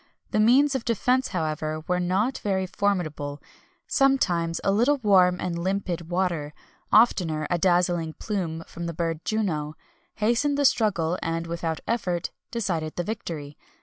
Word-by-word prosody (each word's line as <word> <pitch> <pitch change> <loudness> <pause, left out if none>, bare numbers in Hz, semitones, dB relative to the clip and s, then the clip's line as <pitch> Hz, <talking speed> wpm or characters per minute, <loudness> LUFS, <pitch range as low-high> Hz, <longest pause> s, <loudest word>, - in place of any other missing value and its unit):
The - - +1
means 265 +6 +5
of 265 -3 -2
defence, 250 +3 +1
however, 155 -3 -2
were 180 0 +1
not 190 +8 0
very 190 -2 0
formidable; 175 -7 -2 0.5
sometimes 175 - +2
a 195 - +2
little 240 +8 +3
warm 185 -6 +4
and 170 -2 -3
limpid 185 -3 -2
water 175 -5 -1 0.4
oftener 175 -9 +4
a 175 - +1
dazzling 175 -2 +2
plume 170 -6 -3
from 170 0 -6
the 170 - -5
bird 165 -1 -1
of 155 - -25
Juno 155 -9 -1 0.4
hastened 240 +7 +1
the 285 - +2
struggle, 190 -9 +2
and, 165 0 -2
without 165 -1 -3
effort, 180 -7 -1 0.2
decided 175 -9 -2
the 175 - -1
victory. 165 -8 -6
180 Hz, 150 wpm, -25 LUFS, 165-215 Hz, 0.5 s, means